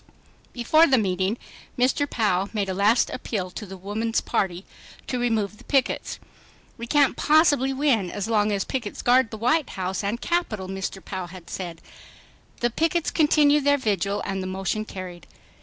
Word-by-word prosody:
Before 310 +7 +4
the 265 - +4
meeting, 190 0 0 0.4
Mr. 265 +3 +2
Pou 200 -4 +1
made 205 -3 -1
a - - -1
last 205 +5 +3
appeal 190 -7 -4
to 210 +2 -7
the 190 +1 -9
Woman's 215 +4 -1
Party 185 -1 -2 0.4
to 250 - -2
remove 220 -3 -1
the - - -15
pickets.... 270 -3 0 0.6
"We 235 - -7
can't 285 +1 +3
possibly 295 -4 +4
win 265 -9 +1
as 200 +3 -4
long 210 -2 +2
as 200 -2 0
pickets 235 -6 -4
guard 245 -1 +4
the 220 - -7
White 250 +7 +1
House 190 +1 -2
and 210 +4 -2
Capitol," 240 - -1
Mr. 190 0 -5
Pou 185 -2 -5
had 175 -1 -12
said. 175 -3 -6 0.8
The 240 0 +1
pickets 330 +5 0
continued 295 -2 +4
their 285 0 +4
vigil 205 -4 -1
and 195 -1 -2
the 185 - -4
motion 195 +3 -2
carried. 185 -3 -8
215 Hz, 170 wpm, -24 LUFS, 190-260 Hz, 0.8 s, Before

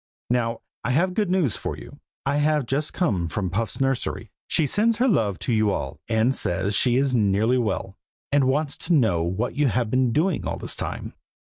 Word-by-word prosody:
Now 115 -2 0 0.2
I - - -2
have 175 +8 +2
good 205 -1 0
news 175 - +1
for - - -4
you. - - -12 0.3
I 140 +1 +1
have 150 -2 +2
just 140 +5 -1
come 95 - 0
from 90 +2 -3
Puff's 110 +4 -2
nursery; 135 -2 -1 0.2
she 160 - +2
sends 215 - +2
her 250 +2 +3
love 110 - +2
to 120 - +1
you 110 -1 +3
all, 70 -7 -4
and 115 +3 +2
says 100 -3 -1
she 120 +4 +3
is 135 0 +2
nearly 110 +2 +2
well, 100 -3 -2 0.3
and 140 -1 +4
wants 145 +2 0
to 175 - -1
know 110 - +3
what 95 +8 -1
you 145 0 +2
have 115 -1 0
been 130 -1 +2
doing 160 +6 +1
all - - -2
this - - -3
time." - - -5
125 Hz, 205 wpm, -24 LUFS, 105-145 Hz, 0.3 s, and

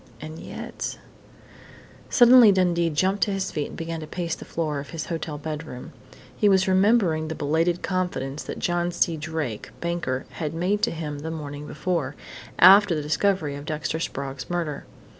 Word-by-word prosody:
And 155 +3 -8
yet - - -6 1.1
Suddenly 240 -3 +8
Dundee 175 -3 +2
jumped 190 +6 0
to 205 - -3
his 195 -1 -2
feet 150 - -2
and - - -10
began 165 0 -4
to 155 - -7
pace 170 0 -3
the - - -7
floor 155 -3 -2
of 140 - -8
his 165 - -5
hotel 160 -3 -4
bedroom. 150 -3 -7 0.4
He 210 - +3
was 190 0 +4
remembering 185 -5 +3
the 160 - -4
belated 165 +4 0
confidence 155 -7 -2
that - - -5
John 175 0 0
C. 170 -1 +1
Drake, 155 -7 -4
banker, 170 -7 -2
had 160 -1 -4
made 190 +5 0
to - - +2
him 150 -3 -5
the 160 +2 -5
morning 150 -2 -6
before 160 -5 -2 0.4
after 195 0 +8
the 150 - -2
discovery 155 -1 0
of 145 +1 -8
Dexter 155 +1 -2
Sprague's 135 -4 -5
murder. 170 -5 -3
165 Hz, 170 wpm, -25 LUFS, 150-185 Hz, 1.1 s, Suddenly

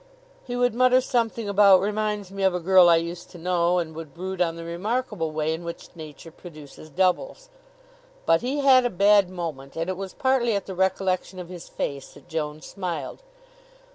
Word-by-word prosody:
He 245 - -5
would 245 -2 +1
mutter 255 +1 +4
something 230 -3 -1
about 200 -2 +6
"Reminds 210 0 -2
me 195 0 -6
of 190 -2 +2
a - - -1
girl 180 0 +6
I 170 - +7
used 170 +1 -4
to - - -12
know," 175 0 +1
and 165 -2 -2
would 160 -2 -9
brood 185 +1 -5
on 165 -2 +1
the 165 - -8
remarkable 195 +1 -3
way 155 0 -1
in 165 +2 -6
which 170 +1 -9
Nature 160 0 -11
produces 155 -3 -13
doubles. 190 - -1 0.8
But 165 - +3
he 270 +4 -2
had 265 -2 +6
a 245 - +1
bad 200 0 +4
moment, 160 -7 -6
and 165 +3 -2
it 185 - -5
was 195 -1 -7
partly 260 -4 +1
at 200 - -2
the 190 - -6
recollection 190 0 -1
of 180 -1 -8
his 180 -2 -10
face 140 -1 -5
that - - -17
Joan 155 -2 -4
smiled. 175 - -5
185 Hz, 195 wpm, -24 LUFS, 165-210 Hz, 0.8 s, I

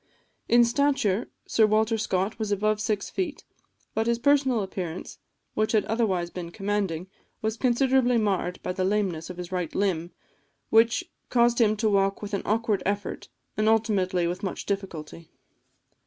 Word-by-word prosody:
In 240 0 +6
stature, 235 -5 +1 0.2
Sir 220 -1 +3
Walter 220 +1 +2
Scott 195 0 -1
was 215 -2 -2
above 210 +1 +1
six 215 -2 -1
feet; 355 -6 -3 0.5
but 225 +1 0
his 235 0 +2
personal 265 -3 +3
appearance, 185 -3 -6 0.3
which 215 +1 0
had 215 - +3
otherwise 190 -7 0
been 175 -2 -6
commanding, 195 -3 -2 0.4
was 220 0 0
considerably 250 0 +3
marred 190 -5 0
by 180 - -2
the 185 - -1
lameness 185 -5 0
of 180 - -7
his 180 0 -7
right 180 -3 -3
limb, 175 -4 0 0.6
which 230 +2 +4 0.3
caused 240 0 +3
him 215 -1 +3
to 220 +1 +1
walk 195 -1 +2
with 205 - -6
an 200 - 0
awkward 215 -2 +1
effort, 200 0 -3 0.3
and 215 +1 +2
ultimately 195 -5 +2
with 175 +1 -2
much 190 - -4
difficulty. 170 -5 -5
210 Hz, 155 wpm, -26 LUFS, 185-230 Hz, 0.6 s, In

